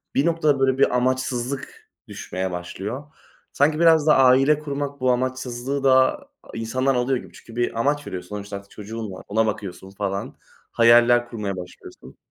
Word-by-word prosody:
bir 140 - +2
noktada 155 -4 +2
böyle 135 -1 +2
bir 130 - +3
amaçsızlık 130 +1 -2 0.2
düşmeye 95 0 -5
başlıyor. 95 +9 -5 0.5
Sanki, 150 +2 +2
biraz 160 -2 +5
da 150 - +6
aile 135 +3 +5
kurmak 140 -1 -4
bu 130 -1 +2
amaçsızlığı 130 +1 -2
da 130 - +4 0.3
insandan 130 +4 -1
alıyor 125 +2 +1
gibi. - - -11
Çünkü, 115 - -14
bir 120 -1 -1
amaç 145 +3 0
veriyorsun. 90 -1 -7
Sonuçta 100 -1 -6
çocuğun 110 0 -7
var, 95 - -10
ona 110 +2 +1
bakıyorsun 100 -3 -5
falan, 100 0 -4 0.4
hayaller 120 +1 +5
kurmaya 105 -5 -4
başlıyorsun. 90 0 -11
125 Hz, 150 wpm, -23 LUFS, 105-135 Hz, 0.5 s, da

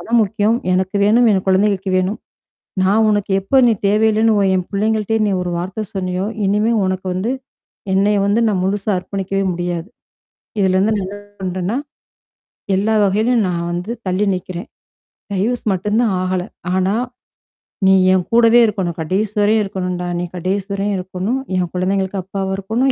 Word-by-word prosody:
பணம் 235 +1 +1
முக்கியம். 215 +2 +1 0.2
எனக்கு 190 +2 0
வேணும், 230 +3 +4
என் 190 -1 0
குழந்தைகளுக்கு 190 0 +2
வேணும். 185 +4 -1 0.7
நான் 215 +4 +3
உனக்கு 205 -2 0
எப்போ 265 +8 +1
நீ 230 - +4
தேவையில்லன்னு 220 +1 +3
ஓ - - +3
என் 180 -1 -1
பிள்ளைங்கள்ட்டயே 220 +2 0
நீ - - +1
ஒரு 180 - -3
வார்த்தை 190 +5 -4
சொன்னையோ, 185 0 -2 0.2
இனிமே 210 +4 +2
உனக்கு 185 0 -2
வந்து, 200 +7 -1 0.6
என்னைய 200 +2 +3
வந்து 205 +3 +2
நான் 195 -4 0
முழுசா 200 +2 -1
அர்ப்பணிக்கவே 195 +1 -3
முடியாது. 175 0 -3 0.7
இதுலருந்து 190 +3 +2
ந - - -2 0.4
பண்றேன்னா, 185 +4 -2 1.0
எல்லா 210 +3 +1
வகையிலயும் 215 +3 +2
நான் 170 -1 -2
வந்து 180 +6 -4 0.2
தள்ளி 185 +3 +1
நிக்கிறேன். 180 +2 -5 0.7
டைவர்ஸ் 225 +6 -1
மட்டும் 210 +4 0
தான் 220 -5 +1
ஆகல. 185 -1 -1 0.3
ஆனா, 190 +2 +1 0.9
நீ 190 - +6 0.2
என் 185 -2 +1
கூடவே 235 0 +6
இருக்கணும். 190 -5 -2
கடைசிவரையும் 210 +5 +1
இருக்கணும்டா. 180 -2 -3
நீ - - -2
கடைசிவரையும் 195 +2 -2
இருக்கணும். 190 +7 -3 0.2
என் 180 -2 0
குழந்தைங்களுக்கு 190 +1 -1
அப்பாவா 190 0 -3
இருக்கணும். 230 +7 0
195 Hz, 145 wpm, -18 LUFS, 185-215 Hz, 1.0 s, நீ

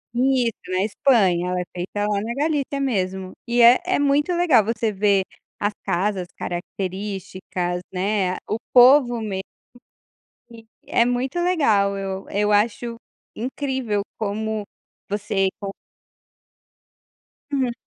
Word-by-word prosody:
Isso, 250 -2 +2
na 185 +1 0
Espanha, 200 -6 +2
ela 180 0 -1
é - - -2
feita 200 +4 -2
lá 205 -1 0
na 225 +3 -3
Galícia 285 -1 -1
mesmo 190 -8 -1 0.2
e 240 0 +3
é 240 +2 +8
é 370 +1 +1
muito 285 +3 +2
legal 335 -10 +4
você 225 +1 -1
ver 200 -1 +2 0.4
as 205 +1 0
casas 185 0 -1
características, 185 -1 -4
né, 190 0 0
o 215 - -2
povo 250 -1 +6
mesmo, 195 -3 -3 1.1
e 225 -1 -13 0.2
é 235 - +3
muito 245 +6 -1
legal 225 - +2
eu 195 0 -4
eu 205 +1 +1
acho 230 +3 +1 0.4
incrível 255 -3 -2 0.2
como 215 0 -2 0.4
você 200 -1 0
con 200 -1 -4 1.8
Hum. 260 -4 0
210 Hz, 120 wpm, -22 LUFS, 195-250 Hz, 1.8 s, é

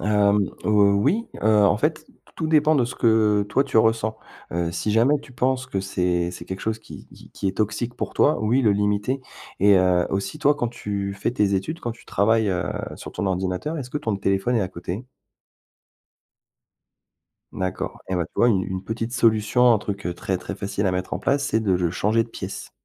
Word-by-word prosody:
Hem, 105 -1 +2 0.2
heu, 105 -1 +4
oui. 200 - +1 0.2
Heu, 105 -1 +5
en 105 - +3
fait, 155 +5 -1 0.3
tout 160 - -2
dépend 155 -1 +4
de 125 - +3
ce 120 - -5
que 110 -3 +3
toi 135 +7 +2
tu 135 - -3
ressens. 110 0 +2 0.4
Heu, 85 0 -1
si 105 +4 -2
jamais 130 +7 +4
tu 135 -3 -15
penses 130 +1 0
que 100 -7 -2
c'est 90 -2 0
c'est 90 - -9
quelque 95 0 -6
chose 110 0 -2
qui - - -12 0.3
qui 95 - -2
est 95 - -4
toxique 110 +3 -1
pour - - -4
toi, 150 - +3
oui 120 +5 +2
le 110 - +4
limiter. 105 +6 0 0.4
Et 100 0 +6
heu, 90 -1 +3
aussi, 95 +8 -3
toi 145 -1 +4
quand 120 -5 -2
tu 100 -4 -4
fais 100 +4 -2
tes 100 -4 +1
études, 125 - -3
quand 120 - -3
tu 115 - -18
travailles, 110 +1 +2
heu, 90 -2 -1 0.2
sur - - -9
ton 100 - -3
ordinateur, 95 - -2
est-ce 125 -4 -6
que 150 - -2
ton 110 -8 -2
téléphone 100 +5 0
est 115 - +2
à 95 - -1
côté? 90 +6 -6 2.5
D'accord. 95 -1 -4
Et 95 - -1
ouais, 85 -2 0
tu - - -33
vois 120 - +4
une 95 -5 +2
une 95 0 -4
petite 115 +2 -4
solution, 115 +1 +4
un 110 - +3
truc 100 -2 -5
très, 95 +1 -2
très - - -6
facile 100 0 -3
à 90 - +1
mettre 90 0 -2
en - - -2
place, 140 +1 +1
c'est 110 - +1
de 100 -4 +1
le 90 -2 +1
changer 110 +5 +1
de 115 - -11
pièce. - - -7
105 Hz, 210 wpm, -23 LUFS, 95-120 Hz, 2.5 s, Et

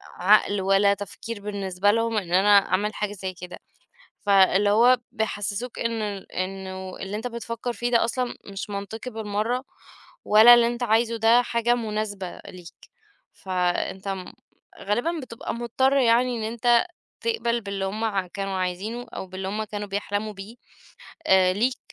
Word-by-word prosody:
عقل، 200 +1 +3
والّا 195 +1 +4
تفكير 205 +2 -7
بالنسبة 200 -1 0
لهم، 230 0 0
إن 180 -3 -3
أنا 195 +3 +4 0.2
أعمل 205 +3 0
حاجة 210 -1 -3
زي 190 -2 -5
كده. 180 0 -10 0.7
فاللي 200 +1 +4
هو 245 +4 +5
بيحسسوك 220 +1 -3
إن 230 -1 -2
ال 200 -2 -6
إنه 190 0 -5
اللي 195 +2 -5
أنت 225 +3 -5
بتفكر 235 0 -4
فيه 240 +1 -3
ده 235 - +3
أصلًا 250 +1 -2
مش 200 +1 -6
منطقي 205 +5 -6
بالمرّة، 220 +3 -2 0.6
والا 220 +3 +8
اللي 240 -1 +4
أنت 240 +1 -4
عايزه 230 +1 +2
ده 230 +2 +5
حاجة 240 0 +1
مناسبة 210 -5 -4
ليك. 175 -2 -12 0.6
فأنت 185 +1 -2
م 190 -2 -5 0.5
غالبًا 245 +12 -1
بتبقى 230 -3 -6
مضطر 250 +4 +1
يعني، 245 -1 +3
إن 220 - -4
أنت 235 +4 +3 0.3
تقبَل 240 - 0
باللي 200 -2 -4
هُم 210 +4 -3
ع 195 -4 -1
كانوا 195 +1 -4
عايزينه، 195 +7 -3
أو 190 - -5
باللي 190 +1 -6
هُم 215 +2 -2
كانوا 205 0 -6
بيحلموا 205 +2 -3
بيه 205 +4 -10 1.0
ليك، 245 +6 0
210 Hz, 150 wpm, -24 LUFS, 195-235 Hz, 1.0 s, والا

